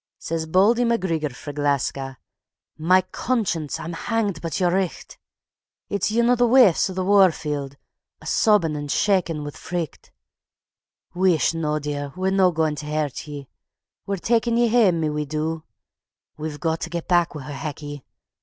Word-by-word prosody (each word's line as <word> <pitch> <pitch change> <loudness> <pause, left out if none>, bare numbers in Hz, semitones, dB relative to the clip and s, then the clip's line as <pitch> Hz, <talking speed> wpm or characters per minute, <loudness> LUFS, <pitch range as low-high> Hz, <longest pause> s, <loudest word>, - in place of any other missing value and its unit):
_ - - -70
Says 160 -1 -4
Bauldy 205 +9 +4
MacGreegor 165 - 0
frae 145 +3 -8
Gleska: 140 -2 -1 0.6
"Ma 185 +4 +4
conscience! 185 - -1
I'm 170 - -5
hanged 210 0 -2
but 165 -4 -3
yer 175 -2 +2
richt. 190 -2 -3 0.7
It's 200 0 0
yin 235 +2 +2
o' - - +5
thae 245 0 +3
waifs 235 -8 +5
of 185 - -6
the 185 -1 -1
war 195 -2 +6
field, 145 -3 -5 0.4
a' - - -16
sobbin' 205 -9 +3
and 145 -1 -5
shakin' 175 -6 +1
wi' 145 - -5
fricht. 165 0 -6 1.0
Wheesht 175 -5 +2
noo, 155 -2 -1
dear, 145 -1 -4
we're 185 +1 0
no 190 -1 +4
gaun 160 -2 0
tae 150 0 -7
hurt 150 -2 -2
ye. 145 -2 -8 0.6
We're 200 0 -1
takin' 230 +4 +1
ye 240 -1 +3
hame, 205 -8 +3
my 155 - 0
wee 150 0 -2
doo! 155 +2 -3 0.7
We've 155 -1 -6
got 160 -1 -1
tae 165 - -4
get 170 -1 -5
back 175 -2 +2
wi' 145 - -6
her, 145 +2 -7
Hecky. 145 0 -6
165 Hz, 170 wpm, -23 LUFS, 150-195 Hz, 1.0 s, war